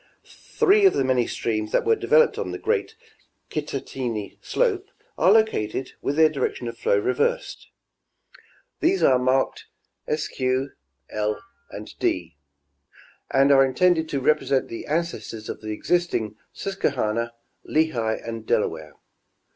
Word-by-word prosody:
Three 415 -2 +3
of - - +3
the - - +1
many 130 -2 +2
streams 110 -2 -2
that - - +1
were 450 - +4
developed 475 +2 +3
on - - -3
the - - -4
great 445 -1 -1 0.6
Kittatinny 130 -7 -4
slope 410 -6 0 0.3
are 190 - +4
located, 200 - +1
with 140 - -1
their 160 0 +6
direction 140 -5 -2
of 115 - -5
flow 115 -3 +1
reversed; 480 - -1 1.1
these 370 +4 +2
are 130 -1 +5
marked 130 +1 +1 0.5
Sq, 155 - -6 0.7
L 105 0 -1 0.3
and - - -9
D, 345 - -1 0.9
and 135 +1 +4
are 135 -1 +7
intended 160 +4 +2
to 140 - -1
represent 135 -1 +1
the 115 - -7
ancestors 155 -9 -3
of - - -6
the 110 - -7
existing 110 - -1 0.2
Susquehanna, 120 - -2 0.3
Lehigh 125 -9 0
and 115 -1 -6
Delaware. 80 -6 -1
135 Hz, 130 wpm, -24 LUFS, 115-180 Hz, 1.1 s, are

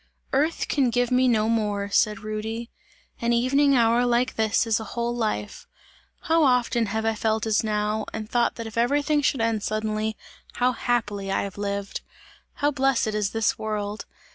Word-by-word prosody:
"Earth 300 +5 +1
can 270 -4 +2
give 245 +1 0
me 255 +1 +4
no 220 -3 +2
more," 210 -3 0
said 210 0 +2
Rudy, 220 +2 -5 0.5
"an 235 0 +1
evening 275 +4 +3
hour 235 0 +4
like 245 +1 +1
this 220 +2 +2
is 225 0 +1
a - - -5
whole 235 0 -1
life! 215 -3 -3 0.5
How 325 -1 +2
often 245 -3 +2
have 220 +2 -2
I 225 - +2
felt 220 0 -1
as 220 -1 +2
now, 215 0 -1
and 215 -1 -5
thought 240 +1 +1
that 230 - -6
if 225 +1 -4
everything 290 +4 +2
should 275 -3 +1
end 225 -2 0
suddenly, 215 +1 -2 0.4
how 250 +1 +2
happily 220 -5 -1
have 195 0 -2
I - - -4
lived! 200 0 -3 0.5
How 290 +1 0
blessed 270 -5 +1
is 210 -2 -1
this 225 0 0
world! 210 -1 -4
225 Hz, 175 wpm, -25 LUFS, 215-245 Hz, 0.5 s, me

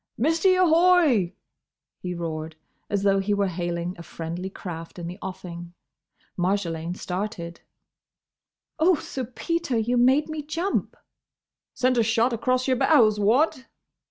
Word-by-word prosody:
"Missie, 325 - +3
ahoy!" 330 - +4 0.6
he 180 -1 -4
roared, 160 -2 -5 0.3
as 200 -1 -1
though 195 -1 +3
he 205 +1 0
were 200 0 +1
hailing 175 -1 -3
a - - -6
friendly 170 +2 -6
craft 165 -3 -8
in 175 - -6
the 180 +3 -7
offing. 175 -2 -8 0.6
Marjolaine 175 -2 -1
started. 180 -2 -5 1.2
"Oh, 345 +3 +5
Sir 265 -2 -5
Peter! 275 +2 -2
You 240 +3 +1
made 260 +5 +4
me 315 -1 -4
jump!" 330 +6 -2 0.8
"Sent 255 -1 +2
a - - +4
shot 230 +2 +2
across 255 +3 0
your 260 -1 +2
bows—what?" 255 +1 +3
210 Hz, 130 wpm, -25 LUFS, 175-270 Hz, 1.2 s, Oh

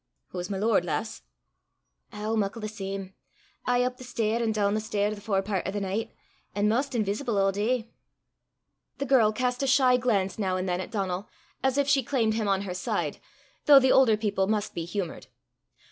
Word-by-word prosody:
"Hoo's 180 0 -5
my 195 - -2
lord, 210 -2 +2
lass?" 195 +6 -3 0.9
"Ow, 210 0 -3
muckle 210 +1 -1
the 215 - -4
same 195 -2 -6 0.5
aye 245 0 +3
up 250 0 -2
the - - -10
stair 230 -2 -1
an' 225 -1 +1
doon 205 -2 +1
the 215 - +1
stair 210 -1 -1
the 205 - -9
forepairt 195 -2 -1
o' - - -1
the 205 +1 -2
nicht, 200 +3 -3 0.4
an' 205 +1 +2
maist 255 +5 0
inveesible 215 +1 -1
a' 195 0 +3
day." 225 +3 -1 1.1
The 280 - -2
girl 245 -5 +4
cast 250 +3 -1
a 275 - 0
shy 260 -2 +5
glance 210 -6 0
now 190 -3 0
and 185 +1 -2
then 180 0 -1
at - - -7
Donal, 195 -2 -3 0.3
as 265 0 +1
if 285 -1 +2
she 280 -1 +4
claimed 230 -3 0
him 220 -1 -1
on 195 -1 +2
her 185 -3 -4
side, 180 - -2 0.5
though 285 -2 +10
the 260 -1 +3
older 235 -5 +5
people 205 -3 0
must 210 0 -1
be 165 - -4
humoured. 180 -1 -5
215 Hz, 195 wpm, -27 LUFS, 195-245 Hz, 1.1 s, though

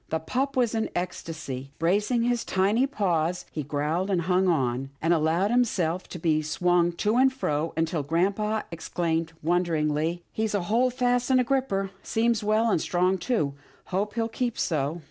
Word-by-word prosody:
The 160 - 0
pup 260 - -2
was 240 -3 +2
in 220 -1 0
an - - -6
ecstasy. 155 -7 -5
Bracing 205 +8 +1
his 240 -1 +1
tiny 205 +8 +2
paws, 180 - 0
he 155 - -3
growled 150 +6 -1
and 180 -3 +1
hung 185 +2 +2
on, 135 -5 0
and 165 +2 +2
allowed 165 +5 +2
himself 185 -8 +1
to - - -6
be 155 -2 +1
swung 175 +3 +1
to 210 +7 0
and 265 +1 +5
fro, 160 - -1
until 165 -1 0
grampa 195 +8 0
exclaimed 165 -1 -2
won 175 +3 +2
deringly, 160 0 -1
" - - -43
He's 220 -1 -1
a 200 - +1
hold 240 +6 +1
fast 245 0 +1
and 260 -1 +5
a - - +4
gripper. 235 -7 0
Seems 230 -1 +1
well 215 +2 +2
and 160 - +2
strong 185 +1 +1
too. 170 - 0 0.4
Hope 205 +3 -1
he'll 225 -1 0
keep 240 +1 -2
so." 155 0 -1
180 Hz, 185 wpm, -26 LUFS, 160-225 Hz, 0.4 s, and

